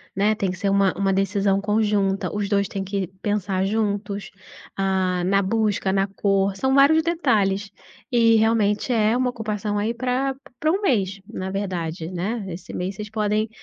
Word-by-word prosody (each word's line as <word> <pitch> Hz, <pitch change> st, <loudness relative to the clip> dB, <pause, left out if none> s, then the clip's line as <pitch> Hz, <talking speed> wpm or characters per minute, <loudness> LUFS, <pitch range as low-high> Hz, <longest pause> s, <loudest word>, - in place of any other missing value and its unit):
né. 205 Hz, +3 st, +2 dB
Tem 195 Hz, -3 st, -1 dB
que 180 Hz, -, -7 dB
ser 200 Hz, +2 st, 0 dB
uma 195 Hz, -1 st, +3 dB
uma 195 Hz, -1 st, +1 dB
decisão 195 Hz, 0 st, +1 dB
conjunta, 205 Hz, -2 st, +1 dB
os 210 Hz, -1 st, -2 dB
dois 200 Hz, -1 st, +1 dB
têm 195 Hz, +1 st, -4 dB
que 195 Hz, -1 st, -2 dB, 0.2 s
pensar 200 Hz, -2 st, 0 dB
juntos, 205 Hz, -1 st, -2 dB, 0.5 s
ah, 190 Hz, -2 st, 0 dB
na 195 Hz, +2 st, +3 dB
busca, 205 Hz, -1 st, 0 dB
na 195 Hz, 0 st, +2 dB
cor, 195 Hz, 0 st, 0 dB
são 265 Hz, +6 st, +1 dB
vários 285 Hz, +3 st, +6 dB
detalhes. 215 Hz, -, +1 dB, 0.4 s
E 230 Hz, -1 st, +5 dB
realmente 220 Hz, +1 st, +2 dB
é 220 Hz, +1 st, +3 dB
uma 250 Hz, 0 st, +1 dB
ocupação 210 Hz, -3 st, -3 dB
aí 215 Hz, +3 st, 0 dB
pra 255 Hz, +3 st, -1 dB, 0.2 s
pra 310 Hz, -, +2 dB
um 385 Hz, +4 st, 0 dB
mês, 200 Hz, -, +1 dB
na 190 Hz, -4 st, -5 dB
verdade, 180 Hz, -4 st, -3 dB
né. 200 Hz, +5 st, -3 dB
Esse 180 Hz, 0 st, -8 dB
mês 185 Hz, +2 st, -3 dB
vocês 210 Hz, +1 st, -7 dB
podem 215 Hz, 0 st, 0 dB
205 Hz, 170 wpm, -23 LUFS, 195-220 Hz, 0.5 s, vários